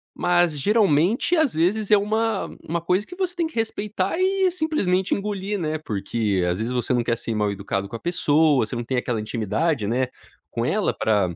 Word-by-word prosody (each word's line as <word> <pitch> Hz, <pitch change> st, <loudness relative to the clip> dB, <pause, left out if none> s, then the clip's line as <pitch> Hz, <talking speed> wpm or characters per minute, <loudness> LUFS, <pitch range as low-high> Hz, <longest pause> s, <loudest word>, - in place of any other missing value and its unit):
mas, 175 Hz, -3 st, +2 dB
geralmente, 200 Hz, -, +2 dB
às 315 Hz, -6 st, +2 dB
vezes, 200 Hz, +6 st, +1 dB
é 210 Hz, -, +8 dB
uma 220 Hz, +2 st, 0 dB, 0.2 s
uma 170 Hz, +2 st, -1 dB
coisa 180 Hz, +4 st, 0 dB
que 360 Hz, -, -11 dB
você 365 Hz, -2 st, -2 dB
tem 340 Hz, -2 st, 0 dB
que 320 Hz, -, -15 dB
respeitar 210 Hz, -, -1 dB
e 380 Hz, +1 st, +2 dB
simplesmente 305 Hz, -, 0 dB
engolir, 200 Hz, 0 st, -2 dB
né, 155 Hz, -2 st, -1 dB
porque, 105 Hz, -6 st, -1 dB
às 90 Hz, +2 st, -1 dB
vezes, 115 Hz, +2 st, -2 dB
você 125 Hz, 0 st, 0 dB
não 120 Hz, -1 st, +1 dB
quer 115 Hz, 0 st, 0 dB
ser 115 Hz, -1 st, -3 dB
mal 105 Hz, -1 st, +1 dB
educado 100 Hz, 0 st, -3 dB
com 115 Hz, -, -5 dB
a -, -, -18 dB
pessoa, 155 Hz, -4 st, +2 dB
você 120 Hz, +3 st, -5 dB
não 120 Hz, -, -3 dB
tem 130 Hz, -, -2 dB
aquela 120 Hz, -2 st, -1 dB
intimidade, 110 Hz, -, -1 dB
né, 125 Hz, +4 st, +1 dB, 0.4 s
com -, -, -3 dB
ela -, -, 0 dB
ara 100 Hz, -5 st, +2 dB
170 Hz, 200 wpm, -23 LUFS, -, 0.4 s, é